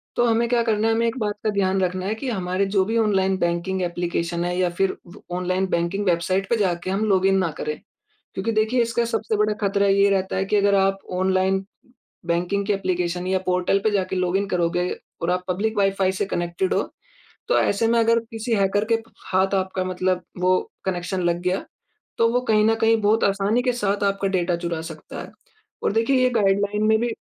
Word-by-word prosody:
तो 240 - +3
हमें 230 0 +2
क्या 240 -1 +3
करना 220 -1 +1
है 225 - +3
हमें 230 +1 +1
एक 230 - -2
बात 210 -2 -1
का 215 - +1
ध्यान 190 -1 +1
रखना 185 0 -1
है, 215 +3 -1
कि 255 +4 -4
हमारे 185 -2 -1
जो 195 -1 +2
भी 225 +3 -1
ऑनलाइन 195 -4 +2
बैंकिंग 175 +2 -1
ऐप्लीकेशन 175 -1 -2
है 180 0 -2
या 180 -1 +2
फ़िर 190 +2 0 0.2
व 210 - -14
ऑनलाइन 185 +1 0
बैंकिंग 170 +5 -1
वेबसाइट 185 +2 0
पे 235 - +3
जाके 185 -3 -1
हम 200 +3 0
लॉगिन 195 -1 +3
ना 185 -3 +1
करें। 150 - -4 0.5
क्योंकि 205 +4 -2
देखिए 220 +3 +2
इसका 235 0 0
सबसे 225 -1 -1
बड़ा 210 0 +2
ख़तरा 200 0 +2
ये 200 +1 +4
रहता 190 -1 0
है 190 0 0
कि 205 - 0
अगर 200 0 +3
आप 195 0 +2
ऑनलाइन 190 +1 +1 0.6
बैंकिंग 180 +4 0
के 210 - +2
ऐप्लीकेशन 180 -2 -2
या 190 0 +1
पोर्टल 180 +2 +1
पे 220 - +3
जाके 190 -2 -1
लॉगिन 185 +2 0
करोगे 175 0 0 0.3
और 170 - -1
आप 180 0 -1
पब्लिक 210 +4 -1
वाइ-फ़ाई 195 -1 +2
से 190 +2 -2
कनेक्टेड 175 0 -2
हो - - +2 0.7
तो - - +3
ऐसे 215 +3 +1
में 235 0 +3
अगर 230 0 +4
किसी 225 +1 -3
हैकर 200 +1 +1
के - - +6 0.4
हाथ 190 +1 +2
आपका 190 0 -1
मतलब 185 0 -1 0.2
वो 185 +1 +3 0.3
कनेक्शन 185 0 -2
लग 175 0 +1
गया 180 +1 -1 0.5
तो 230 - +5
वो 245 - +2
कहीं 215 -1 +4
न 225 - +3
कहीं 225 0 +4
बहुत 215 +2 +2
आसानी 200 +4 +2
के 250 -1 +1
साथ 205 -4 -1
आपका 195 0 0
डेटा 180 -2 0
चुरा 170 -1 -3
सकता 160 -2 -8
है। - - -10 0.5
और - - +2
देखिए 230 +4 +2
ये 255 - +4
गाइडलाइन 205 -1 +1
में 220 - +4
भी 240 0 -1
195 Hz, 210 wpm, -23 LUFS, 180-215 Hz, 0.7 s, के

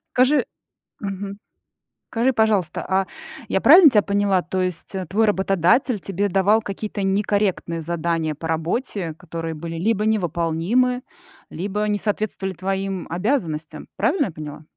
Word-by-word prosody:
Скажи 260 +4 +4 0.6
Мгм. 200 0 -5 0.7
Скажи, 240 +3 +2
пожалуйста, 215 -8 +1
а 190 0 +2 0.4
я - - +2
правильно 350 -5 +8
тебя 210 -5 +3
поняла, 200 -2 +1
то 185 +1 -2
есть, 180 +1 -4
э, 185 -3 -4
твой 220 +5 +2
работодатель 200 - +2
тебе 195 +2 -2
давал 200 +4 +3
какие-то 205 0 -5
некорректные 195 -4 0
задания 165 -1 -1
по 160 +2 -6
работе, 165 - -2
которые 165 -1 -6
были 165 +1 -6
либо 210 +3 +1
невыполнимы, 205 - +1 0.5
либо 205 +5 -3
не 210 -1 +1
соответствовали 205 -2 -2
твоим 190 +1 -3
обязанностям? 170 - -2
Правильно 295 -8 +2
я - - -5
поняла? 150 -1 -8
195 Hz, 135 wpm, -22 LUFS, 170-210 Hz, 0.7 s, правильно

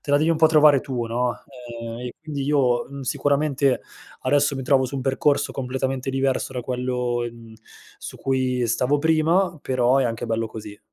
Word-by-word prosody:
te 145 - -5
la 145 - +5
devi 155 +2 +1
un 165 - +2
po' 160 - +5
trovare 150 -3 +5
tu, 120 -3 -4
no, 120 +1 -1 0.5
ehm, 115 +1 -6
e 125 -1 -5
quindi 150 -3 -5
io, 135 -4 +2
mhmm, 140 0 -9
sicuramente 140 0 +1 0.4
adesso 140 +1 +2
mi 135 - -4
trovo 130 0 +3
su 130 - -5
un 135 - -3
percorso 140 +2 +1
completamente 130 0 -3
diverso 135 0 -1
da 125 - -3
quello 125 -1 -2
in, 120 0 -7
mhmm, 110 - -14 0.4
su - - -9
cui 130 -2 0
stavo 125 +5 +1
prima, 160 +3 +2
però 130 0 +2
è 135 - +3
anche 115 0 -3
bello 115 0 -1
così. 105 -2 -9
130 Hz, 190 wpm, -23 LUFS, 125-145 Hz, 0.5 s, la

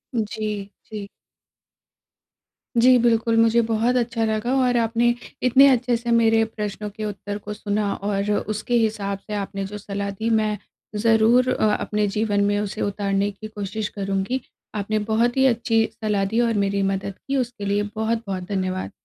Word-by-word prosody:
जी, 215 -2 -2 0.2
जी। 210 -2 -7 1.7
जी 250 +2 +6
बिल्कुल 230 -1 +3
मुझे 230 +1 +5
बहुत 230 +3 +2
अच्छा 230 -1 0
लगा 220 +3 -1
और 245 -1 +2
आपने 230 +1 +2 0.4
इतने 265 +3 +7
अच्छे 250 -2 +3
से 235 0 -3
मेरे 225 -1 +4
प्रश्नों 210 -1 -4
के 215 +1 -6
उत्तर 205 0 -5
को 210 0 -7
सुना 205 -1 -1
और 200 +1 -2
उसके 215 +3 -2
हिसाब 200 -2 -1
से 215 - -5
आपने 195 -1 -3
जो 205 +2 -6
सलाह 200 0 -4
दी, 220 +4 -3
मैं 215 -2 +1 0.4
ज़रूर 225 +3 +4
अ, 210 -1 +2
अपने 210 -1 -1
जीवन 205 -2 +1
में 205 0 +1
उसे 210 -2 -4
उतारने 200 0 0
की 215 +2 -9
कोशिश 210 0 -4
करूँगी। 195 +6 -1 0.3
आपने 215 +1 -1
बहुत 240 +3 +2
ही 265 - +5
अच्छी 225 -2 +2
सलाह 210 -3 -1
दी। 220 +4 0
और 230 -1 +2
मेरी 200 0 0
मदद 195 0 -1
की, 275 0 0
उसके 240 -4 -3
लिए 205 +1 +1
बहुत-बहुत 220 -4 -2
धन्यवाद। 185 -1 -2
215 Hz, 165 wpm, -23 LUFS, 200-230 Hz, 1.7 s, इतने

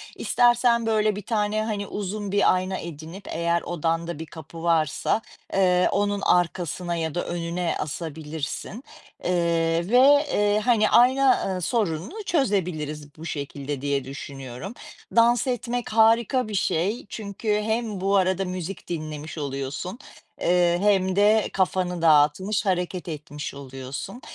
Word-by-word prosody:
İstersen 240 -1 +3
böyle 215 -2 +2
1 205 - -5
tane, 215 0 0
hani, 205 -3 -3
uzun 205 0 -4
bir 205 -2 +4
ayna 185 +1 -1
edinip 165 +4 -8
eğer 170 +1 0
odanda 165 -1 -2
bir 160 - -5
kapı 165 +1 -10
varsa, 165 +5 +1 0.3
eee, 180 -2 +4
onun 205 0 0
arkasına 175 -1 0
ya 160 -1 -3
da 175 - -1
önüne 170 0 -2
asabilirsin. 160 - -5 0.4
Eee, 170 -1 +1
ve, 280 +5 +6
eee, 205 0 +3
hani, 225 -4 +4
ayna, 260 +2 +5
ııı, 185 -1 -2
sorununu 205 - -2
çözebiliriz 160 - -1
bu 160 - -9
şekilde 140 -2 -5
diye 140 -1 0
düşünüyorum. 135 - -7 0.4
Dans 235 +2 +4
etmek 245 -1 -2
harika 230 +2 +4
bir 210 - -4
şey 190 +5 0
çünkü 210 0 -2
hem 220 -3 -2
bu 195 +1 +2
arada 190 0 +2
müzik 180 +1 -5
dinlemiş 155 -1 -5
oluyorsun, 140 - -4 0.4
eee, 175 0 +3
hem 190 -2 +2
de 210 +2 +4
kafanı 180 -2 0
dağıtmış, 160 +7 +3
hareket 180 -1 -1
etmiş 150 -1 -6
oluyorsun. 135 - -7
180 Hz, 130 wpm, -25 LUFS, 160-210 Hz, 0.4 s, ve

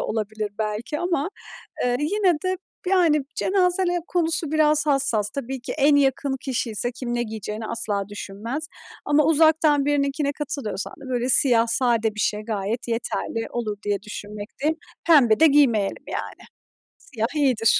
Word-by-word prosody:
olabilir 215 -1 -3
belki 215 +7 -3
ama, 345 -3 0 0.6
eee, 245 0 +2
yine 365 +5 +2
de, 370 0 0 0.3
yani, 340 -6 +4
cenaze 375 -1 +2 0.2
konusu 330 -3 0
biraz 305 -1 +3
hassas. 270 -8 +1
Tabii 265 0 -5
ki - - -5
en 290 0 +5
yakın 275 0 +2
kişi 255 -3 -2
ise 240 +3 -2
kim 240 0 -4
ne 240 - 0
giyeceğini 215 -1 -5
asla 210 -4 -1
düşünmez 220 +9 -5 0.4
Ama 290 0 +3
uzaktan 315 -2 +4
birininkine 285 0 +1
katılıyorsan 275 -8 -4
da 265 - -9
böyle 245 0 -1
siyah 235 -3 +4
sade 230 -3 +1
bir - - -7
şey 210 0 0
gayet 215 +2 -3
yeterli 230 0 -2
olur 215 -4 -3
diye 205 -1 -1
düşünmekteyim. 210 +8 -4 0.3
Pembe 260 -10 +6
de 320 - +7
giymeyelim 250 -9 +3
yani. - - -6 0.5
Siyah 225 -4 -3
iyidir. 255 -7 +3
255 Hz, 145 wpm, -23 LUFS, 220-300 Hz, 0.6 s, de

